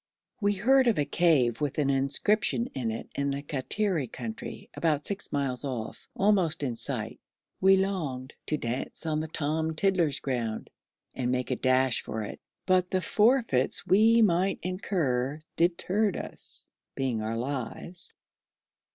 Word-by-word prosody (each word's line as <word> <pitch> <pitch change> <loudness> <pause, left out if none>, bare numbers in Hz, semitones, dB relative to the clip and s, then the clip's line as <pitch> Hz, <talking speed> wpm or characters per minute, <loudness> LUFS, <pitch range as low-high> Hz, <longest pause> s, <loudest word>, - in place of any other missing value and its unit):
We 205 0 +3
heard 255 +6 +4
of 230 - +3
a 145 - +2
cave 145 -6 +2
with 145 -2 -1
an 140 -2 +2
inscription 205 - +2
in 125 -4 -2
it 110 +1 -5
in 140 0 -1
the 140 0 -3
Kattiri 150 +3 -1
country, 115 -3 -7
about 150 -3 0
six 200 0 -3
miles 135 -3 -1
off, 125 -6 -5
almost 190 -7 +2
in 125 -4 -1
sight. - - -3 0.4
We 190 0 +6
longed 155 -9 -2
'to 155 - 0
dance 125 +5 -4
on 155 -1 0
Tom 160 +1 -1
Tiddler's 170 -6 +2
ground' 120 -5 -3 0.4
and 125 -1 -2
make 125 0 -1
a - - +2
dash 130 -1 +2
for 110 0 -4
it, 105 - -7 0.3
but 185 -1 +3
the 185 - +1
forfeits 215 - +2
we 225 +4 +5
might 190 0 +2
incur 150 -8 -1 0.2
deterred 185 +4 +1
us, - - -7 0.2
being 125 -5 -1
our 110 +1 -2
lives. 140 +7 -5
150 Hz, 145 wpm, -28 LUFS, 130-190 Hz, 0.4 s, We